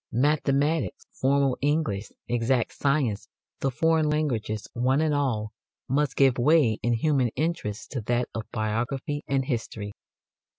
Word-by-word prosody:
Mathematics, 145 +3 +1
formal 135 -1 +1
English, 140 -9 0 0.2
exact 120 0 +1
science, 140 -7 0 0.3
the 135 - +1
foreign 160 +3 +2
languages, 120 -9 -1
one 130 +3 +2
and 155 -1 +2
all, 120 -7 0 0.4
must 140 +1 +1
give 135 -3 +4
way 135 -4 +4
in 120 - +1
human 135 +1 +2
interest 150 -9 -2
to 130 - -3
that 120 +3 0
of 110 -1 -5
biography 120 +7 -2
and 135 -1 +1
history. 110 -5 -4
135 Hz, 130 wpm, -26 LUFS, 115-145 Hz, 0.4 s, give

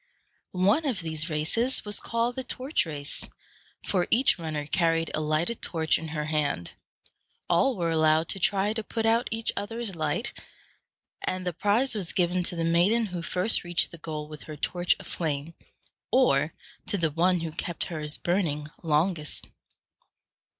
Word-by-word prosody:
One 200 - +3
of 225 -9 -1
these 160 0 -3
races 195 +14 +3
was 210 -1 +3
called 230 +1 -1
the 260 - -3
torch 255 - -1
race, 145 -2 -3 0.6
for 180 -3 +1
each 250 -5 +3
runner 155 -3 -3
carried 165 0 +1
a 155 - -1
lighted 155 +9 0
torch 160 -2 +1
in 160 - -6
her 150 -1 -3
hand. 150 - -1 0.7
All 250 +10 +3
were 170 -2 0
allowed 160 0 +3
to 195 - +1
try 200 +3 +2
to 220 -1 -3
put 225 +1 -3
out 230 +2 +3
each 225 0 0
other's 225 -1 -3
light; 155 - -2 0.9
and 185 0 -3
the 180 - -1
prize 210 - +1
was 195 -6 -2
given 180 0 +1
to 175 - +1
the 165 - -1
maiden 175 +8 +3
who 180 -4 -5
first 185 +5 +2
reached 175 0 +2
the 170 - -11
goal 155 -1 -5
with 150 -1 -10
her 155 - -6
torch 175 +4 +1
aflame, 155 -1 -3 0.6
or 170 - +3 0.3
to 205 - +1
the 165 -4 0
one 175 +3 +2
who 165 -1 -4
kept 170 +1 -3
hers 150 -3 +2
burning 160 -5 -1
longest. 160 0 0
170 Hz, 165 wpm, -27 LUFS, 155-205 Hz, 0.9 s, One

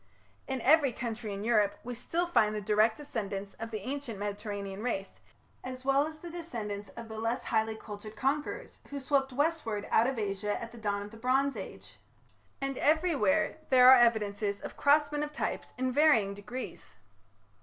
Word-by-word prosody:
In 265 -2 -2
every 290 0 +5
country 225 -3 -4
in 200 0 -4
Europe 215 -3 +2
we 245 - -5
still 330 +9 -1
find 215 -11 +2
the - - -1
direct 215 +2 +3
descendants 200 -8 -4
of 225 0 -5
the 215 -2 -4
ancient 275 -5 -4
Mediterranean 205 -1 -4
race, 195 -5 -3 0.4
as 255 0 -7
well 275 +2 +3
as 310 0 -9
the 340 +2 -9
descendants 225 -12 -5
of 235 - -7
the 220 0 -7
less 230 +3 -1
highly 220 0 0
cultured 215 0 -9
conquerors 290 - -2
who 285 - -4
swept 270 0 +1
westward 260 -7 -1
out 230 - +5
of 265 -2 -2
Asia 205 -1 -2
at 230 0 -7
the 235 - -11
dawn 200 -2 -1
of 205 - -10
the 225 - -11
Bronze 265 +4 +1
Age; - - -9 0.6
and 275 -1 -3
everywhere 315 - +2
there 255 -1 +8
are 260 - +10
evidences 210 -3 +2
of - - -8
crossment 295 +1 +3
of 300 - -4
types 300 - -3
in 255 0 0
varying 255 -9 +4
degrees. 210 +6 -8
235 Hz, 175 wpm, -30 LUFS, 210-280 Hz, 0.6 s, are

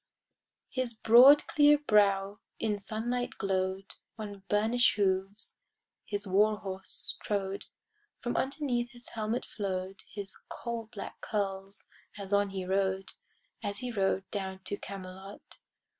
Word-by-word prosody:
His 255 -3 -2
broad 250 +7 +8
clear 295 0 +6
brow 205 -6 +3 0.2
in 210 -2 0
sunlight 240 +4 -2
glow'd; 190 0 -1 0.2
On 205 -2 -6
burnish'd 225 +4 +3
hooves 195 +1 0 0.5
his 205 0 -2
war 210 +3 +4
horse 190 -1 -4
trode; 195 -1 -2 0.5
From 240 - -2
underneath 265 -3 -1
his 240 0 -8
helmet 220 +2 -2
flow'd 190 -2 -4
His 200 -1 -6
coal 235 -2 -5
black 205 - -8
curls 195 -1 -2 0.3
as 200 -1 0
on 200 0 +4
he 190 -1 -4
rode, 190 0 0 0.5
As 200 -2 -3
he 250 0 -3
rode 195 -3 +1
down 190 -2 -4
to 205 - -2
Camelot. 190 0 -9
205 Hz, 125 wpm, -31 LUFS, 195-230 Hz, 0.5 s, broad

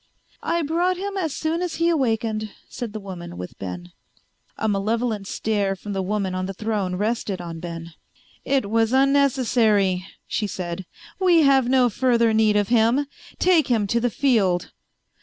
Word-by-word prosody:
"I 335 0 0
brought 350 +4 +1
him 400 +2 -4
as 345 -6 -1
soon 320 +4 -2
as 355 -2 -2
he 335 - +1
awakened," 225 -8 0 0.2
said 240 -3 -6
the 215 - -5
woman 180 - -8
with 90 0 -8
Ben. 90 -2 -6 0.7
A 220 - -1
malevolent 215 +1 -1
stare 205 -3 -1
from 205 +2 -7
the 195 - -1
woman 195 0 -1
on 185 0 -2
the 195 - -6
throne 205 -3 -2
rested 210 -1 -2
on 170 -2 -6
Ben. 170 -1 -7 0.5
"It 270 -6 +1
was 225 +1 +2
unnecessary," 245 -9 +3 0.2
she 210 - -2
said. 180 -1 -5 0.3
"We 350 -4 +5
have 270 -3 +4
no 255 -1 +4
further 235 -1 +2
need 220 -1 +3
of 205 -1 +1
him. 240 +4 +3 0.3
Take 355 -4 +3
him 225 -4 +2
to 230 +4 +1
the 245 +1 +1
field." 215 - +1
220 Hz, 165 wpm, -23 LUFS, 195-265 Hz, 0.7 s, We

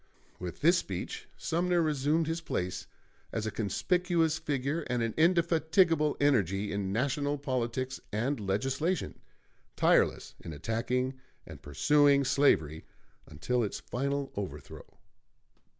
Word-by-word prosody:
With 90 -1 -7
this 170 +4 +5
speech 95 -2 -6
Sumner 175 +1 0
resumed 155 0 +1
his 165 +2 -2
place 90 - -3 0.4
as 110 -1 -3
a 110 - -2
conspicuous 165 - 0
figure 145 +1 -2
and 120 -1 0
an 115 -1 -2
indefatigable 165 -1 +3
energy 105 - +2
in 100 -1 -2
national 140 +6 0
politics 130 -1 -2
and 120 +6 -1
legislation, 135 - -1 0.6
tireless - - +2
in 80 - -8
attacking 125 - -2 0.3
and - - -11
pursuing 140 - +3
slavery 80 - +2 0.4
until 120 +12 -1
its 105 - -3
final 140 +2 -3
overthrow. 100 -2 -8
135 Hz, 115 wpm, -30 LUFS, 110-155 Hz, 0.6 s, this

